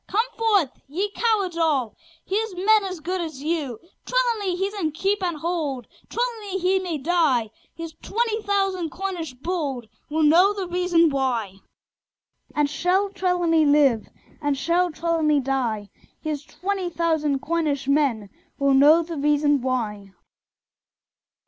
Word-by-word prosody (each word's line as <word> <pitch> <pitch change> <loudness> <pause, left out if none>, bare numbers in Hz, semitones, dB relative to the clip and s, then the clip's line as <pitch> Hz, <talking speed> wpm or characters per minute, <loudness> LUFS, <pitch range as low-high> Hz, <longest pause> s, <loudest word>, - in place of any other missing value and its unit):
come 440 +4 +1
forth! 410 - +2 0.2
ye 380 +9 -2
cowards 410 -6 0
all: 290 -9 +1 0.3
Here's 420 0 -2
men 410 +3 +3
as 370 -4 -5
good 360 +3 -2
as 310 -5 -6
you. 300 -8 -2 0.2
Trelawny 465 -7 0
he's 390 +3 -2
in 330 -7 -2
keep 390 +5 0
and 350 -4 -1
hold; 300 -7 -2 0.2
Trelawny 450 -5 -2
he 380 +1 +2
may 355 -4 -3
die: 285 -8 +1 0.2
Here's 330 -1 -7
twenty 450 0 -1
thousand 390 -4 0
Cornish 350 -6 -5
bold 275 -5 -3 0.2
Will 315 +1 +1
know 350 +7 +5
the 395 -2 -4
reason 350 -2 +2
why 240 -8 -1 1.0
And 295 -1 +2
shall 365 +6 +1
Trelawny 350 -4 +2
live? 285 -6 +3 0.3
Or 290 -1 +1
shall 340 +5 +1
Trelawny 315 -2 +1
die? 240 -7 -2 0.3
Here's 300 -2 -4
twenty 375 +2 -3
thousand 320 -4 0
Cornish 300 -5 -1
men 270 -9 +1 0.3
Will 280 -1 +2
know 300 +5 +6
the 330 -1 -6
reason 290 -1 +2
why! 210 -6 -3
330 Hz, 135 wpm, -24 LUFS, 280-375 Hz, 1.0 s, know